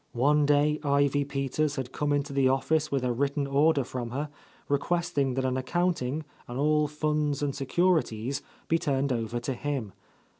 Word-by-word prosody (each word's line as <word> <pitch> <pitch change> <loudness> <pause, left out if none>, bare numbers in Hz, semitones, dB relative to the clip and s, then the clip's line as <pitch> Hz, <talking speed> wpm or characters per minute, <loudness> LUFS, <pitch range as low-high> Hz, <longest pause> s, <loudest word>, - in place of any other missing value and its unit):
One 145 +4 +3
day 150 +1 +3
Ivy 140 0 +2
Peters 140 +2 -1
had 130 -3 -4
come 145 +1 -1
into 145 0 0
the 135 -1 +3
office 150 +4 +1
with 135 -2 0
a 125 -1 +1
written 140 +3 0
order 140 +1 +3
from 120 -1 -5
her, 145 +5 -3 0.4
requesting 140 -2 0
that 130 0 0
an 130 0 0
accounting, 155 0 -1 0.2
and 120 - -6
all 150 +1 +3
funds 150 -1 -1
and 140 -1 0
securities, 140 -5 0 0.3
be 165 - +2
turned 140 -2 0
over 115 0 -2
to 135 - -2
him. 130 -6 -3
140 Hz, 165 wpm, -28 LUFS, 130-150 Hz, 0.4 s, One